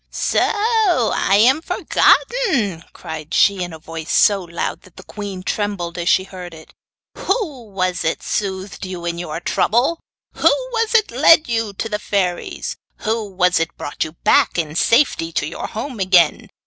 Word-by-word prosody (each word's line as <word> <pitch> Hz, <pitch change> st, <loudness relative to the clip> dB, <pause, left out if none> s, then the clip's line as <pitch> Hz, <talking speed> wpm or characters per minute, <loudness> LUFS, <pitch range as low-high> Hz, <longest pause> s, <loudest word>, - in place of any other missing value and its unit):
'So -, -, 0 dB
I 410 Hz, -, +2 dB
am 260 Hz, +8 st, +4 dB
forgotten!' 250 Hz, -, +1 dB
cried 160 Hz, 0 st, -7 dB
she, 200 Hz, -2 st, +3 dB
in 175 Hz, -1 st, -4 dB
a 160 Hz, -, -8 dB
voice 160 Hz, 0 st, -7 dB
so 200 Hz, -2 st, +4 dB
loud 170 Hz, -1 st, -4 dB
that 185 Hz, -, -20 dB
the -, -, -12 dB
queen 200 Hz, -3 st, -7 dB
trembled 195 Hz, -5 st, -3 dB
as 170 Hz, +1 st, 0 dB
she 190 Hz, -, +4 dB
heard 180 Hz, -3 st, -10 dB
it. 160 Hz, -, -15 dB, 0.5 s
'Who 305 Hz, -, -2 dB
was 185 Hz, -3 st, -2 dB
it 160 Hz, -, -2 dB
soothed 190 Hz, -1 st, -3 dB
you 185 Hz, -2 st, -6 dB
in 170 Hz, 0 st, -3 dB
your 165 Hz, -2 st, -5 dB
trouble? 245 Hz, -, +1 dB, 0.4 s
Who -, -, +3 dB, 0.2 s
was 455 Hz, -1 st, 0 dB
it 430 Hz, -2 st, +3 dB
led 325 Hz, -1 st, +5 dB
you 225 Hz, -3 st, -1 dB
to 210 Hz, -, -4 dB
the 210 Hz, -1 st, -3 dB
fairies? 185 Hz, -4 st, -2 dB, 0.2 s
Who 220 Hz, -1 st, -2 dB
was 180 Hz, -2 st, +2 dB
it 165 Hz, -, -3 dB
brought 145 Hz, -, -3 dB
you 155 Hz, -, -7 dB
back -, -, +3 dB
in 155 Hz, -2 st, -2 dB
safety 230 Hz, -, +2 dB
to -, -, 0 dB
your -, -, -5 dB
home 230 Hz, +1 st, -6 dB
again? 180 Hz, -4 st, +3 dB
195 Hz, 170 wpm, -19 LUFS, 175-230 Hz, 0.5 s, led